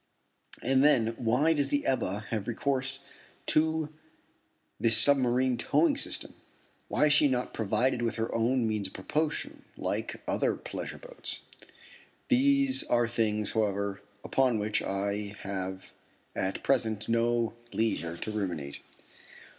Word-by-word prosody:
And 130 +2 +3
then, 120 -6 +4
why 125 +8 +3
does 145 -3 +1
the 145 0 0
Ebba 105 -6 0
have 110 -3 -2
recourse 135 +3 -1 0.4
to 160 0 +1 0.9
this 115 -1 +5
submarine 130 -2 +4
towing 290 - +2
system? 280 - -1 0.5
Why - - +2
is 150 - +5
she 150 0 +6
not 125 -2 -1
provided 115 +4 +1
with 115 -1 -1
her 115 0 -2
own 115 +1 +1
means 105 -3 0
of - - -14
propulsion, 150 +11 -2
like - - -3
other - - +1
pleasure - - -6
boats? - - -4 0.9
These 275 +1 +3
are 120 -1 +2
things, 110 -3 0
however, 100 -2 -1 0.2
upon 130 -4 +2
which 105 0 0
I 100 +1 -2
have 95 -1 -5 0.4
at 95 +1 -2
present 110 -6 +1
no 115 0 +1 0.2
leisure 85 -7 -1
to 110 - -4
ruminate. 85 -9 -4
115 Hz, 130 wpm, -29 LUFS, 105-140 Hz, 0.9 s, she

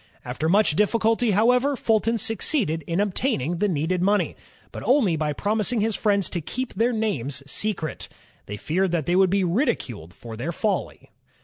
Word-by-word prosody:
After 135 +6 -2
much 200 -4 +3
difficulty, 225 +4 +2
however, 250 +7 +3
Fulton 225 -1 +1
succeeded 220 - 0
in 170 +2 -1
obtaining 185 - -1
the 210 - +2
needed 175 +1 -1
money, 205 +3 +1 0.4
but - - -7
only 240 - +3
by 155 -1 -1
promising 215 - -1
his 215 0 +1
friends 200 -3 +1
to 175 - -2
keep 255 - -5
their 230 +5 +1
names 145 - -2
secret. 165 0 -3 0.4
They 105 - -5
feared 185 - 0
that 160 -4 0
they 175 - +1
would 190 0 +4
be 195 +1 +1
ridiculed 130 - -2
for 115 -2 -9
their 130 +10 -3
folly. 205 +4 -3
195 Hz, 170 wpm, -24 LUFS, 160-225 Hz, 0.4 s, would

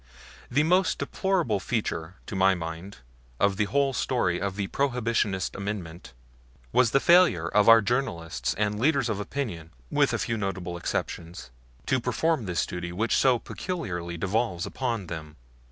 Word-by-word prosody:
The 140 +5 +3
most 180 +4 +3
deplorable 180 - 0
feature, 95 -6 -3
to 115 - -6
my 95 0 +4
mind, 85 +3 -6 0.4
of 100 -1 +2
the 105 - +2
whole 140 +4 +1
story 105 -11 0
of 100 -1 -2
the 100 -1 -2
Prohibition 115 -5 0
amendment, 100 -4 -6 0.6
was 125 - +4
the 135 - +3
failure 170 - +5
of 105 +3 +4
our 115 -1 +8
journalists 85 - -1
and 105 0 -1
leaders 135 -1 +2
of 105 -2 -1
opinion, 105 - -4 0.2
with - - +3
a - - 0
few 115 - -2
notable 95 -4 -3
exceptions, 85 -4 -4 0.3
to 130 - +2
perform 125 +3 0
this 90 -3 0
duty 90 -1 -5
which 110 +6 0
so 130 -2 +4
peculiarly 90 - -5
devolves 95 -1 -1
upon 120 -6 -3
them. 80 -2 -7
105 Hz, 155 wpm, -27 LUFS, 90-125 Hz, 0.6 s, our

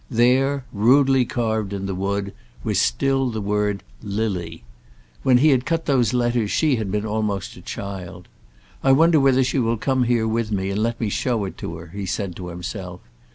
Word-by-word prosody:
There, 130 +3 +2
rudely 130 +4 +4
carved 110 -4 -1
in 100 -1 -4
the 95 - -2
wood, 100 +1 -2 0.3
was - - 0
still 135 - +1
the 110 -2 -3
word 105 0 -1 0.2
LILY. 100 - -3 0.6
When 130 -2 +4
he 145 +2 +5
cut 165 +6 -2
those 125 -6 +2
letters 120 -3 +1
she 150 0 +2
had 110 -3 -3
been 105 +1 -1
almost 105 -3 -2
a - - -12
child. 95 -3 -7 0.6
"I 135 - +5
wonder 160 +3 +5
whether 135 -1 +4
she 130 +2 0
will 115 -1 +1
come 130 +2 +1
here 120 -2 +1
with 110 0 -1
me 95 -1 -1
and 100 +2 -1
let 115 +1 -1
me 110 - -1
show 115 0 -1
it 95 - -6
to - - -5
her," 85 - -10
he 100 -1 -5
said 95 -2 -3
to 90 - -7
himself. 90 +1 -6
110 Hz, 190 wpm, -22 LUFS, 100-125 Hz, 0.6 s, he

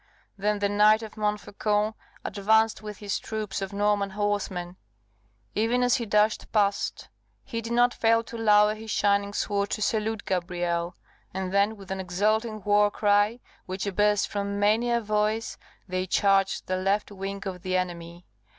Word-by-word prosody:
Then 210 +1 0
the 205 0 +1
Knight 210 +2 +4
of 220 - -9
Montfaucon 210 0 -1 0.3
advanced 220 +2 +2
with 210 -2 -7
his 205 0 -3
troop 215 -3 -4
of 195 - -4
Norman 205 0 +1
horsemen 190 -3 -2 0.8
even 230 +4 +1
as 245 +1 +3
he 235 -3 -4
dashed 210 +1 +1
past, 200 -2 0 0.3
he 230 -4 -4
did 230 +1 -4
not 245 +1 +4
fail 230 0 +2
to 230 - -10
lower 210 -2 +4
his 220 +1 -10
shining 200 -1 +1
sword 200 0 -1
to 215 - -3
salute 220 0 -1
Gabrielle; 175 -1 -2 0.4
and 190 0 -3
then 200 +2 +2
with 195 -1 -11
an 190 - -3
exulting 215 +4 0
war 205 +1 +4
cry, 205 +3 +2 0.3
which 190 +2 -4
burst 210 0 +3
from 200 0 -3
many 215 +4 +2
a 235 0 +2
voice, 215 +1 -1 0.3
they 185 0 -2
charged 195 0 +2
the 185 - -1
left 195 +3 0
wing 195 0 -5
of 185 -2 -5
the 185 0 0
enemy. 175 -1 -5
205 Hz, 160 wpm, -26 LUFS, 195-215 Hz, 0.8 s, Knight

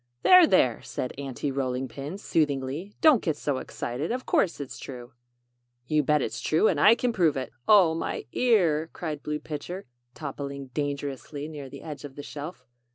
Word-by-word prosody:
"There! 365 -3 +8
There!" 125 - +3
said 125 - -4
Aunty 140 +1 -3
Rolling 130 -1 -2
Pin, 145 +8 -6
soothingly; 150 +1 -1
"don't 310 -8 +6
get 160 -4 -1
so 140 -3 -1
excited! 130 - -4
Of 255 +1 -3
course 175 - +1
it's 140 -2 -7
true." 125 -1 -9 0.7
"You 155 +3 +2
bet 150 0 +2
it's - - -4
true 160 +7 +3
and - - +1
I 220 - +7
can 245 0 0
prove 170 -9 +2 0.2
" 120 0 -40
"Oh, 195 -7 +7
my 165 - -3
ear!" 170 -10 +2
cried 155 -4 -4
Blue 150 +1 -2
Pitcher, 160 +5 -6 0.3
toppling 140 -2 -6
dangerously 145 0 -4
near 145 -4 -8
the - - -10
edge 150 -3 -7
of 140 -2 -9
the 145 - -7
shelf. 145 -2 -8
150 Hz, 175 wpm, -27 LUFS, 135-170 Hz, 0.7 s, There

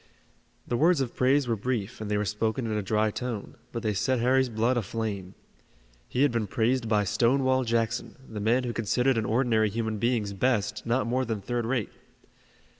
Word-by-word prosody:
The 120 - 0
words 165 +3 +4
of 130 -3 -2
praise 135 +1 +3
were 115 - +1
brief, 110 -2 -3
and 105 - -4
they 105 - +1
were 105 - 0
spoken 110 +4 -1
in 110 -1 -2
a 105 - 0
dry 105 +2 +1
tone, 120 -2 -5 0.2
but 115 - -5
they 110 -2 +1
set 115 +6 +1
Harry's 130 +2 +3
blood 115 +3 +1
aflame. 100 -4 -3 0.7
He 125 - +1
had 145 - +4
been 115 -3 -1
praised 115 +3 0
by 105 -2 +3
Stonewall 130 +6 +2
Jackson, 115 0 -1
the 110 - -6
man 115 +5 +2
who 120 -1 -3
considered 125 +4 +1
an 110 - -2
ordinary 110 -2 +2
human 110 0 -2
being's 115 -3 0
best 110 -1 0
not 120 +3 +1
more 125 +3 0
than 115 -4 -2
third 120 +3 -2
rate. 120 -4 -1
115 Hz, 190 wpm, -27 LUFS, 105-125 Hz, 0.7 s, words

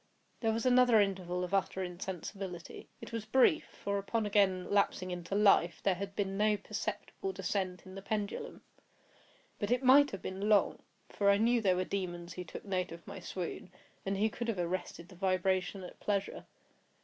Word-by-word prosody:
There 225 -2 +1
was 225 +3 -2
another 250 -3 +6
interval 185 -3 0
of 180 +1 -5
utter 190 -1 +1
insensibility; 180 0 -6
it - - -9
was 230 -2 -4
brief; 265 +7 +4
for, 200 0 -3
upon 215 +3 -1
again 195 -3 +2
lapsing 200 -2 +1
into 180 +2 -4
life 195 -5 +4
there 195 - +3
had 195 +2 -6
been 195 -2 -1
no 210 0 +3
perceptible 205 -1 -4
descent 190 -1 -3
in 185 - -11
the 195 - -7
pendulum. 215 - -4 1.0
But 205 - -2
it 250 +2 +2
might 280 +3 +7
have 195 - -7
been 195 +3 -3
long; 210 -2 +3 0.3
for 200 -1 +2
I 200 - +6
knew 235 +2 +3
there 190 -4 +3
were 185 +1 0
demons 175 -3 -4
who 180 - -5
took 180 - -9
note 185 -3 -1
of 170 0 -10
my - - -8
swoon, 180 0 -5 0.3
and 195 0 -1
who 215 +2 +2
could 235 - -4
have 225 -4 -1
arrested 175 -1 -3
the 185 - -14
vibration 185 +1 0
at 180 - -10
pleasure. 200 -1 -2
195 Hz, 185 wpm, -33 LUFS, 185-210 Hz, 1.0 s, might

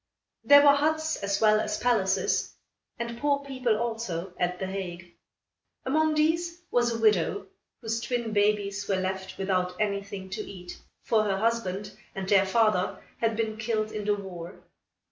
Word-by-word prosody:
There 285 0 +8
were 285 -1 +8
huts, 315 +2 +1
as 200 0 -1
well 215 -1 +5
as 210 -1 -2
palaces, 195 -6 +1 0.4
and 235 0 -5
poor 280 0 +1
people, 255 -5 0
also, 215 -6 -3
at 180 0 0
The 190 - -3
Hague. 180 -2 -6 0.7
Among 310 +3 +2
these, 335 +3 +1
was 240 -1 +2
a 230 - -2
widow, 215 - +2 0.4
whose 225 +1 -2
twin 235 -3 -2
babies 205 -1 +1
were 195 - +1
left 190 0 -3
without 185 -2 -1
anything 200 -2 -3
to - - -3
eat 180 -2 -9 0.3
for 215 -2 +2
her 195 -2 0
husband 210 -3 -1 0.2
and 190 -1 -4
their 195 -1 +4
father 215 -3 +2 0.2
had 225 -1 +1
been 220 -1 -1
killed 220 -1 -1
in 210 -1 -5
the 210 0 +2
war. 180 -3 -9
215 Hz, 160 wpm, -27 LUFS, 190-235 Hz, 0.7 s, There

